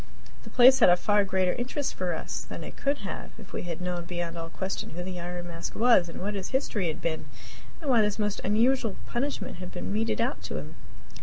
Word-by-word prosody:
The -, -, -10 dB
place 260 Hz, +1 st, +8 dB
had 225 Hz, -, +8 dB
a 175 Hz, -, +6 dB
far 205 Hz, +2 st, +3 dB
greater 185 Hz, -2 st, +1 dB
interest 265 Hz, +3 st, -2 dB
for 180 Hz, -2 st, -1 dB
us -, -, -4 dB
than -, -, -7 dB
it -, -, -8 dB
could 280 Hz, +1 st, 0 dB
have -, -, -3 dB
had -, -, -13 dB
if 210 Hz, -5 st, -13 dB
we -, -, -2 dB
had 165 Hz, 0 st, -4 dB
known 180 Hz, -1 st, -2 dB
beyond 175 Hz, -1 st, -3 dB
all 165 Hz, -1 st, -5 dB
question 190 Hz, +3 st, -4 dB
who 175 Hz, -, -3 dB
the 180 Hz, -1 st, -5 dB
Iron 175 Hz, 0 st, -5 dB
Mask 170 Hz, -1 st, -6 dB
was, 225 Hz, -7 st, +5 dB
and 165 Hz, -, -7 dB
what 205 Hz, +3 st, -2 dB
his 195 Hz, -2 st, -3 dB
history 230 Hz, -8 st, 0 dB
had 160 Hz, -, -4 dB
been, 160 Hz, -1 st, -1 dB, 0.5 s
and 315 Hz, -, -7 dB
why 245 Hz, -4 st, +5 dB
this 210 Hz, -1 st, +1 dB
most 210 Hz, -1 st, -1 dB
unusual 225 Hz, +2 st, +3 dB
punishment 275 Hz, +4 st, -3 dB
had 180 Hz, 0 st, -7 dB
been 90 Hz, +2 st, -4 dB
meted 110 Hz, 0 st, 0 dB
out -, -, 0 dB
to -, -, -4 dB
him. -, -, -6 dB
190 Hz, 235 wpm, -28 LUFS, 175-230 Hz, 0.5 s, place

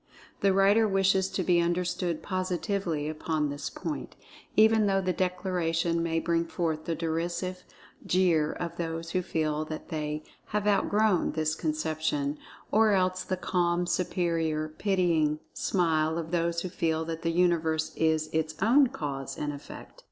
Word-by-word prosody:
The 200 Hz, -, +3 dB
writer 200 Hz, +3 st, +4 dB
wishes 195 Hz, -1 st, +2 dB
to 190 Hz, -1 st, -2 dB
be 175 Hz, -1 st, +3 dB
understood 175 Hz, -1 st, -1 dB
positively 185 Hz, -4 st, -2 dB
upon 155 Hz, -1 st, -1 dB
this 145 Hz, 0 st, -4 dB
point, 155 Hz, -6 st, -5 dB, 0.4 s
even 220 Hz, 0 st, +5 dB
though 195 Hz, -1 st, +2 dB
the 185 Hz, -1 st, 0 dB
declaration 175 Hz, -2 st, 0 dB
may 165 Hz, -1 st, 0 dB
bring 170 Hz, 0 st, +1 dB
forth 160 Hz, -2 st, -2 dB
the 165 Hz, -, -1 dB
derisive 170 Hz, +3 st, -2 dB, 0.4 s
jeer 170 Hz, -5 st, +2 dB
of 170 Hz, -1 st, -5 dB
those 165 Hz, -1 st, -4 dB
who 185 Hz, -, +1 dB
feel 155 Hz, -3 st, -1 dB
that 155 Hz, 0 st, -7 dB
they 150 Hz, -2 st, -3 dB, 0.2 s
"have 210 Hz, 0 st, -1 dB
outgrown" 205 Hz, -2 st, +2 dB
this 155 Hz, 0 st, 0 dB
conception; 155 Hz, -2 st, -1 dB, 0.3 s
or 215 Hz, -1 st, +4 dB
else 185 Hz, -1 st, +1 dB
the 185 Hz, 0 st, -2 dB
calm, 175 Hz, -1 st, +1 dB
superior, 170 Hz, -3 st, 0 dB
pitying 165 Hz, -4 st, +1 dB
smile 160 Hz, -3 st, +1 dB
of 165 Hz, -1 st, -4 dB
those 170 Hz, -1 st, 0 dB
who 185 Hz, -, -4 dB
feel 160 Hz, -2 st, -1 dB
that 165 Hz, 0 st, -5 dB
the 165 Hz, -, 0 dB
Universe 165 Hz, -2 st, +1 dB
is 160 Hz, -1 st, +1 dB
its 155 Hz, 0 st, -1 dB
own 265 Hz, +5 st, +5 dB
Cause 140 Hz, -, -5 dB
and 145 Hz, 0 st, -2 dB
Effect. 145 Hz, -, -11 dB
170 Hz, 150 wpm, -28 LUFS, 160-185 Hz, 0.4 s, even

